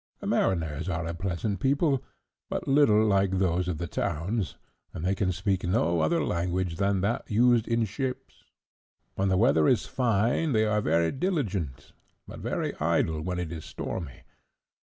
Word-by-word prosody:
"The - - -8
mariners 80 -2 0
are 85 -1 -2
a 85 - -3
pleasant 95 +3 -2
people, 140 - +1 0.5
but - - -3
little 125 -7 +5
like 100 -2 +2
those 90 -1 +1
of 90 -3 -2
the 85 - -3
towns, 90 +5 -2 0.4
and 80 - -4
they 95 - +2
can 95 -1 0
speak 95 +1 -1
no 85 -3 +1
other 165 - +2
language 90 0 -1
than 100 -1 +1
that 110 +7 -1
used 120 +1 +3
in 115 -1 +1
ships. 130 +5 -5 0.7
When 95 0 0
the 95 - +2
weather 120 +9 +4
is 125 -7 +3
fine 120 +4 +1
they 110 -1 +3
are 105 0 +1
very 85 -4 +2
diligent, 110 - -2 0.4
but - - -9
very - - -2
idle, 80 0 +1
when 90 +2 -3
it 90 -2 -3
is 80 -2 -6
stormy. 75 -9 -6
95 Hz, 165 wpm, -27 LUFS, 85-115 Hz, 0.7 s, little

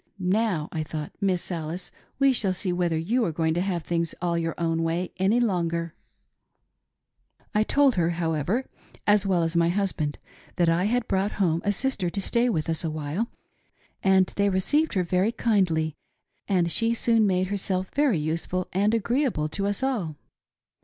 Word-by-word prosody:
Now 185 -3 0
— - - -44
I 160 - -2
thought 155 -1 -5
— - - -42
Miss 185 -2 0
Alice, 170 +2 -5 0.3
we 275 -1 +4
shall 200 -6 +1
see 185 0 -2
whether 175 -2 0
you 225 +10 +1
are 170 - 0
going 160 0 0
to 175 - 0
have 180 -3 -2
things 170 -1 -1
all 175 -1 0
your 165 -1 -1
own 165 -1 0
way 165 +2 -1
any 195 +6 +3
longer! 170 -7 0 0.8
" - - -53 0.7
I 210 - +3
told 275 +4 +3
her, 170 -1 +2
however, 170 - -1 0.4
as 205 -1 +4
well 180 -3 +2
as 165 +1 -2
my 170 0 +3
husband, 175 -6 -1 0.4
that 175 -2 +3
I 170 +3 +2
had 240 +2 0
brought 195 +2 0
home 170 -4 +1
a 205 - +2
sister 205 -4 0
to 200 - -4
stay 235 +5 +1
with 160 -9 -1
us 165 0 -2
awhile, 155 +6 -2 0.7
and 190 -1 +4
they 200 0 +3
received 290 +12 +2
her 185 - +2
very 185 +5 +1
kindly, 175 -10 +1 0.5
and 180 -4 +1
she 230 +5 +2
soon 225 -2 +3
made 185 -1 +1
herself 190 -2 -2
very 280 - +2
useful 165 +4 -2
and 205 +4 +2
agreeable 235 - 0
to 195 +5 -2
us 205 +5 -1
all. 210 - -1
185 Hz, 180 wpm, -26 LUFS, 165-210 Hz, 0.8 s, we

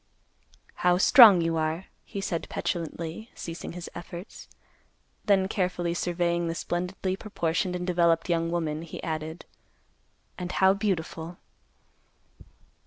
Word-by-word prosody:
"How 180 0 +3
strong 210 -2 +8
you 165 0 0
are," 160 +3 -1 0.2
he 200 - -6
said 170 -4 -3
petulantly; 170 +5 -4
ceasing 165 0 -6
his 175 -1 -7
efforts. 175 +2 -9 0.8
Then 195 -2 +3
carefully 180 -3 -1
surveying 175 0 0
the 165 - -2
splendidly 180 +2 -2
proportioned 180 -3 -2
and 180 0 -3
developed 170 -2 +2
young 165 -1 +1
woman, 160 -3 -2
he 165 -1 -8
added, 160 0 -4 0.9
"And 180 0 -4
how 190 0 +5
beautiful!" 175 -4 -3
175 Hz, 115 wpm, -27 LUFS, 165-185 Hz, 0.9 s, strong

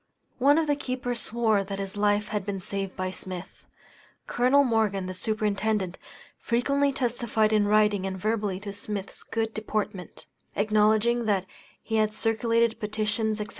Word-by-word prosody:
One 285 +4 +5
of 325 - +2
the 290 -1 +2
keepers 250 -3 -2
swore 220 -3 +2
that 195 0 -5
his 195 0 -5
life 205 0 +1
had 210 -2 -2
been 200 -1 -3
saved 195 0 -4
by 185 0 -2
Smith. 185 -1 -8 0.6
Col. 255 +4 +4
Morgan, 220 -6 +1
the 185 - -4
Superintendent, 210 -1 -1 0.4
frequently 280 +4 +1
testified 235 -4 0
in 210 -1 +3
writing 210 -2 +3
and 190 0 -4
verbally 205 -1 -1
to 200 -1 -6
Smith's 205 -1 -5
good 225 0 -2
deportment; 210 -3 -4 0.3
acknowledging 215 +3 +3
that 195 -3 +1 0.4
he 220 - -1
had 215 0 +1
circulated 230 +1 +1
petitions, 215 +1 -1
&c. 210 - -3
215 Hz, 150 wpm, -27 LUFS, 200-230 Hz, 0.6 s, One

